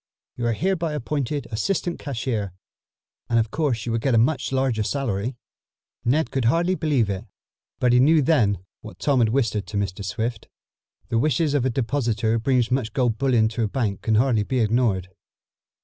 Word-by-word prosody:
You 120 Hz, -, -2 dB
are 115 Hz, -, +2 dB
hereby 170 Hz, -, -1 dB
appointed 145 Hz, 0 st, -2 dB
assistant 175 Hz, -, -1 dB
cashier, 115 Hz, -, -3 dB, 0.8 s
and 115 Hz, -, +2 dB
of 110 Hz, -1 st, +1 dB
course 135 Hz, -9 st, -1 dB
you 120 Hz, -, -2 dB
will 115 Hz, -, 0 dB
get 130 Hz, +1 st, +1 dB
a -, -, +5 dB
much 130 Hz, +7 st, +1 dB
larger 130 Hz, -4 st, +1 dB
salary." 115 Hz, -1 st, -2 dB, 0.7 s
Ned 150 Hz, +7 st, +1 dB
could 135 Hz, -3 st, -1 dB
hardly 170 Hz, +9 st, +2 dB
believe 150 Hz, -, +1 dB
it, 100 Hz, -2 st, -4 dB, 0.5 s
but 125 Hz, -1 st, +3 dB
he 125 Hz, -, +5 dB
knew 150 Hz, +3 st, +5 dB
then 100 Hz, -, +2 dB, 0.2 s
what 110 Hz, -, -11 dB
Tom 140 Hz, -3 st, +1 dB
had 115 Hz, -2 st, +3 dB
whispered 110 Hz, -5 st, 0 dB
to 105 Hz, 0 st, -4 dB
Mr. 100 Hz, -1 st, -2 dB
Swift. 110 Hz, +3 st, -3 dB, 0.6 s
The 115 Hz, -2 st, +1 dB
wishes 150 Hz, +3 st, +1 dB
of 140 Hz, -3 st, +1 dB
a -, -, +2 dB
depositor 115 Hz, -3 st, 0 dB
who 115 Hz, -, +2 dB
brings 125 Hz, 0 st, +1 dB
much 125 Hz, -3 st, 0 dB
gold 120 Hz, -5 st, 0 dB
bullion 125 Hz, -5 st, +3 dB
to 115 Hz, +1 st, -4 dB
a -, -, 0 dB
bank 105 Hz, -3 st, -2 dB
can 110 Hz, -, +1 dB
hardly 115 Hz, -1 st, +3 dB
be 130 Hz, +5 st, -2 dB
ignored. 110 Hz, -5 st, +1 dB
120 Hz, 185 wpm, -23 LUFS, 110-140 Hz, 0.8 s, a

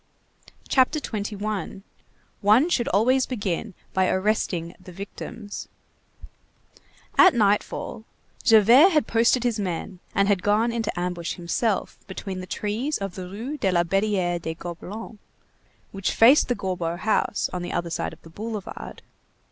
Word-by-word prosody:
CHAPTER 265 Hz, +4 st, +3 dB
XXI—ONE 210 Hz, -, -2 dB
SHOULD 245 Hz, -9 st, +1 dB
ALWAYS 250 Hz, +7 st, +3 dB
BEGIN 200 Hz, -4 st, -3 dB, 0.2 s
BY 190 Hz, -1 st, +2 dB
ARRESTING 185 Hz, -4 st, 0 dB
THE 185 Hz, -, -11 dB
VICTIMS 205 Hz, +3 st, -8 dB, 1.5 s
At 370 Hz, -5 st, +8 dB
nightfall, 215 Hz, +1 st, 0 dB, 0.4 s
Javert 230 Hz, -, +7 dB
had 305 Hz, -, +3 dB
posted 230 Hz, +2 st, +3 dB
his 235 Hz, -3 st, 0 dB
men 185 Hz, -1 st, -4 dB, 0.2 s
and 200 Hz, +1 st, +3 dB
had 200 Hz, -3 st, +2 dB
gone 215 Hz, +4 st, +2 dB
into 225 Hz, -6 st, -2 dB
ambush 175 Hz, -1 st, -3 dB
himself 190 Hz, +4 st, -1 dB
between 190 Hz, 0 st, -6 dB
the 185 Hz, -, -7 dB
trees 225 Hz, +11 st, -2 dB
of 195 Hz, -3 st, -5 dB
the 180 Hz, -1 st, -7 dB
Rue 240 Hz, +10 st, -6 dB
de 190 Hz, -, +1 dB
la 175 Hz, -1 st, +3 dB
Barrière 185 Hz, -1 st, 0 dB
des 160 Hz, 0 st, -4 dB
Gobelins 190 Hz, +6 st, -8 dB, 0.7 s
which 195 Hz, -1 st, -2 dB
faced 255 Hz, +6 st, +6 dB
the 245 Hz, -, 0 dB
Gorbeau 175 Hz, -4 st, -3 dB
house, 215 Hz, +1 st, 0 dB
on 180 Hz, -, -3 dB
the 175 Hz, -, -5 dB
other 170 Hz, -1 st, -2 dB
side -, -, -2 dB
of -, -, -15 dB
the 165 Hz, -, -14 dB
boulevard. 215 Hz, +1 st, -7 dB
205 Hz, 140 wpm, -24 LUFS, 185-230 Hz, 1.5 s, At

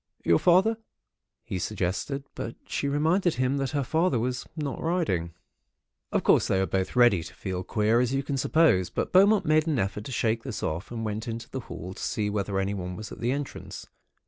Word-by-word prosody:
"'Your 85 Hz, -, +4 dB
father?' 190 Hz, +6 st, +4 dB, 0.7 s
he 95 Hz, -, -4 dB
suggested; 105 Hz, +9 st, -2 dB
but -, -, -5 dB
she -, -, -2 dB
reminded 160 Hz, +5 st, +2 dB
him 130 Hz, +2 st, +1 dB
that 135 Hz, -1 st, -1 dB
her 145 Hz, -2 st, -1 dB
father 160 Hz, +1 st, +1 dB
was 125 Hz, +2 st, -2 dB
not 145 Hz, -3 st, -3 dB
riding. 155 Hz, -, 0 dB, 0.8 s
"Of -, -, +1 dB
course, -, -, +4 dB
they 95 Hz, -, +2 dB
were 95 Hz, -, +2 dB
both 95 Hz, +4 st, -2 dB
ready 120 Hz, -8 st, +5 dB
to -, -, -10 dB
feel 95 Hz, -1 st, -4 dB
queer, 110 Hz, +3 st, +2 dB
as 125 Hz, 0 st, +1 dB
you 135 Hz, +1 st, 0 dB
can 140 Hz, 0 st, -2 dB
suppose; 130 Hz, -, +3 dB
but -, -, -3 dB
Beaumont 200 Hz, +3 st, +5 dB
made 155 Hz, +1 st, +3 dB
an 155 Hz, -4 st, +1 dB
effort 100 Hz, 0 st, -2 dB
to -, -, -6 dB
shake 115 Hz, -1 st, 0 dB
this 115 Hz, -4 st, -6 dB
off, 80 Hz, +4 st, -3 dB
and 115 Hz, -2 st, -4 dB
went 110 Hz, +1 st, -3 dB
into 115 Hz, 0 st, -5 dB
the 135 Hz, -, -3 dB
hall 85 Hz, +2 st, -6 dB
to -, -, -10 dB
see 105 Hz, -1 st, -1 dB
whether 100 Hz, -1 st, -1 dB
anyone 95 Hz, -2 st, -2 dB
was 110 Hz, +4 st, -8 dB
at -, -, -9 dB
the 120 Hz, +1 st, 0 dB
entrance. 140 Hz, 0 st, -5 dB
120 Hz, 205 wpm, -27 LUFS, 95-145 Hz, 0.8 s, ready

